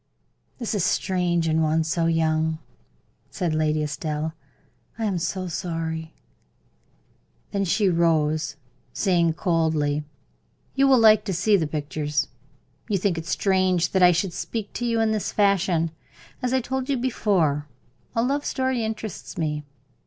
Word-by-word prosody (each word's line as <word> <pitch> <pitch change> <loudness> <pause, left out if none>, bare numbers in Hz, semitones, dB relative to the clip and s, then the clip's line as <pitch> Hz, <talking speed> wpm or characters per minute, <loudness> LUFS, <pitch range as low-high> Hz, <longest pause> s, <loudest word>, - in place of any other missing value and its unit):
"That 235 -3 -3
is 200 -5 0
strange 180 -3 +1
in 160 0 +2
one 160 +1 +2
so 165 +1 0
young," 160 -1 +1 0.7
said 175 -5 -2
Lady 155 0 +1
Estelle. 150 +1 -3 0.6
"I 225 - -2
am 195 -4 0
so 185 +2 -2
sorry." 160 -1 -4 1.4
Then 200 -1 0
she 200 +3 +2
rose, 155 -3 +1 0.4
saying, 170 -5 +2
coldly: 160 -4 0 0.7
"You 275 0 +3
will 265 -1 +6
like 215 -2 +6
to 195 - -1
see 210 +5 +3
the 165 -6 +1
pictures. 150 0 -2 0.6
You 205 - +2
think 185 -3 0
it 165 - -8
strange 185 -3 +2
that 190 - +2
I 180 0 +8
should 170 +1 0
speak 220 +2 -4
to 240 - -2
you 230 -1 +1
in 225 -1 +2
this 215 -2 -1
fashion. 185 -5 +2 0.5
As 250 - -1
I 260 0 +2
told 265 +2 -3
you 275 - +1
before, 185 - +1 0.5
a 230 - +2
love 280 +3 0
story 260 -3 -1
interests 220 -3 -5
me. 150 -2 -2
175 Hz, 145 wpm, -24 LUFS, 160-210 Hz, 1.4 s, I